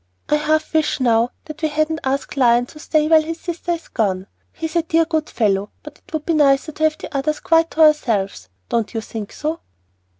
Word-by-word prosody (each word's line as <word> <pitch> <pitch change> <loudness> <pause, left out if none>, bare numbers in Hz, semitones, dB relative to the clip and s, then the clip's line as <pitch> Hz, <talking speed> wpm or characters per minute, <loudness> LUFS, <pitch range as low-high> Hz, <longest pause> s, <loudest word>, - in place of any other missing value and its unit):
I 300 - +4
half 310 +1 0
wish 310 -2 +1
now 235 -2 +3 0.2
that 310 0 -9
we 315 - +2
hadn't 310 +1 0
asked 270 +2 -2
Lion 245 -2 +4
to 305 +4 -14
stay 305 -1 +1
while 320 0 +6
his 325 +1 -5
sister 345 0 -3
is 335 -1 -7
gone. 190 -4 -1 0.3
He's 320 0 -6
a 340 - +4
dear 330 0 +2
good 315 -1 -1
fellow, 205 -3 0
but 300 -1 -11
it - - -24
would 315 -2 -3
be 335 - +1
nicer 285 0 +3
to 310 - -5
have 310 0 +1
the - - -9
others 300 +2 0
quite 330 0 +3
to 320 - -1
ourselves, 230 - +2 0.2
don't 230 0 -1
you 225 - -1
think 220 -2 -7
so?" 310 +2 -3
305 Hz, 220 wpm, -20 LUFS, 245-315 Hz, 0.3 s, while